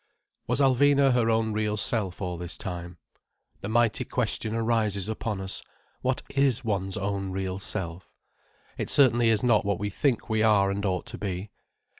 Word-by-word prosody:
Was - - 0
Alvina 140 0 +4
her 120 -2 +2
own 110 -1 +1
real 105 0 -1
self 100 -3 -1
all 90 -1 -2
this 85 -1 -6
time? 90 -1 -6 0.6
The 100 - -5
mighty 115 0 +2
question 115 -2 -2
arises 110 -4 0
upon 110 -2 -3
us, 95 0 -3 0.4
what 130 0 -1
is 135 -3 +2
one's 95 -2 -1
own 100 -1 -2
real 95 0 -3
self? 95 -3 -3 0.7
It - - -2
certainly 120 -5 +4
is 110 -2 +2
not 120 -4 +4
what 100 0 0
we 105 0 -3
think 125 +3 0
we 110 -1 +1
are 105 -3 +4
and 100 +1 -3
ought 90 -1 -1
to - - -7
be. 95 0 -4
105 Hz, 170 wpm, -27 LUFS, 95-115 Hz, 0.7 s, Alvina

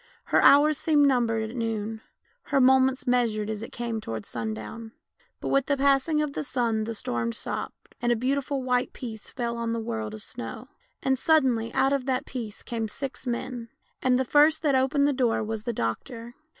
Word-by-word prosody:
Her - - +2
hours 295 +1 +6
seemed 295 -3 +4
numbered 230 -4 +1
at - - -10
noon, 225 -2 -3 0.4
her 280 - +2
moments 265 +1 +4
measured 225 -4 +1
as 215 -1 -4
it 225 - -7
came 235 -2 -3
towards 110 - -6
sundown, 115 - -6 0.5
but - - -4
with 275 -1 +2
the 285 - +1
passing 280 +3 +3
of 290 -2 -3
the - - -3
sun 235 -5 0
the 230 0 -4
storm 120 - -2
stopped, - - -6
and 240 0 +2
a - - +4
beautiful 270 +3 -1
white 250 -1 0
peace 225 -5 -7
fell 235 -2 -3
on 230 0 -2
the 230 - -1
world 220 -1 -4
of 215 - -9
snovv^, - - -7 0.3
and 265 -1 +1
suddenly 260 -8 +3
out 265 +1 +3
of 275 -1 -1
that 255 -1 0
peace 225 -6 -6
came 225 -2 -3
six 270 +3 -6
men; 235 -1 -3 0.3
and 255 -1 +3
the 260 - 0
first 300 +4 +4
that 290 -3 +3
opened 270 +2 +3
the 290 - +2
door 245 -4 +1
was 220 0 -4
the 240 - 0
doctor. 230 - -4
245 Hz, 195 wpm, -26 LUFS, 225-270 Hz, 0.5 s, hours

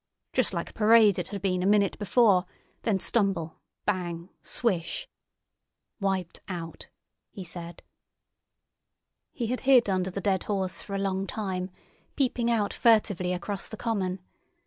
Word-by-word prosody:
Just - - +2
like - - -4
parade 215 -2 +5
it 175 - -3
had 200 -2 -6
been 185 -2 +1
a 185 - +1
minute 200 -1 +3
before—then 200 -1 +1
stumble, 190 -7 0 0.3
bang, 175 -3 -2
swish!" 210 - -1 0.9
"Wiped 190 -3 -1
out!" 170 -3 -6 0.4
he 195 - -8
said. 170 -1 -8 1.5
He 240 - -3
had 250 +3 -1
hid 260 -4 +5
under 185 -1 0
the 190 - -4
dead 190 -1 0
horse 190 -3 -1
for 200 - -6
a - - 0
long 195 0 -1
time, 185 -3 -3 0.5
peeping 245 -3 +1
out 220 -3 +1
furtively 205 -6 +3
across 195 +2 -3
the 220 - -8
common. 195 -6 -1
195 Hz, 135 wpm, -28 LUFS, 180-215 Hz, 1.5 s, parade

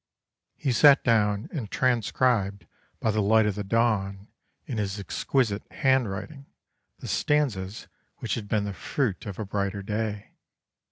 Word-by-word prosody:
He 135 - -1
sat 140 +3 +6
down 105 -3 +2
and 130 - -4
transcribed 115 -4 +1 0.3
by 110 - +1
the 105 0 +1
light 110 +2 +4
of 105 - +1
the 105 +1 -4
dawn 100 -2 0 0.4
in 125 -8 -4
his 100 -1 -2
exquisite 105 +3 0
handwriting 130 +2 -1 0.5
the - - -9
stanzas 115 -10 0 0.3
which - - -3
had 110 -3 -4
been 105 0 +1
the 100 -1 -4
fruit 110 +1 -2
of 100 - -6
a 110 - -4
brighter 100 0 -2
day. 105 0 -3
105 Hz, 145 wpm, -26 LUFS, 100-125 Hz, 0.5 s, sat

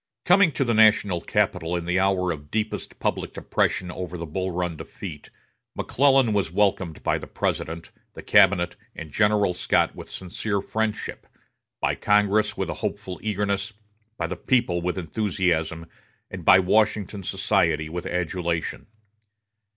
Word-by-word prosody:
Coming 180 -1 +5
to 135 - +1
the 120 -2 0
national 105 -5 +4
capital 90 -4 0
in 85 -1 -3
the 90 +2 +1
hour 95 -2 +2
of 75 -2 -7
deepest 110 +3 -3
public - - -2
depression 90 -1 0
over 90 -1 -6
the 85 - -5
Bull 95 +4 -3
Run 90 -1 -2
defeat, 80 -1 -9 0.5
McClellan 135 -4 +3
was 100 -5 0
welcomed 95 -4 0
by - - +1
the - - -9
President, 80 +1 -3 0.2
the - - -9
cabinet, 90 -2 +4 0.2
and 80 -2 -8
General 105 -2 +2
Scott 90 - +1
with - - -9
sincere 100 +3 -3
friendship, 110 +2 -3 0.5
by - - +1
Congress 105 0 +2
with - - -2
a - - -8
hopeful 90 -1 -4
eagerness, 100 -1 -1 0.4
by 85 - -1
the 90 +3 -3
people 105 -5 +1
with 90 +2 -2
enthusiasm, 85 -3 -1 0.5
and - - -7
by - - +8
Washington 105 +1 +1
society 90 -4 +1
with 85 +2 -5
adulation. 85 -2 -2
95 Hz, 145 wpm, -24 LUFS, 85-105 Hz, 0.5 s, by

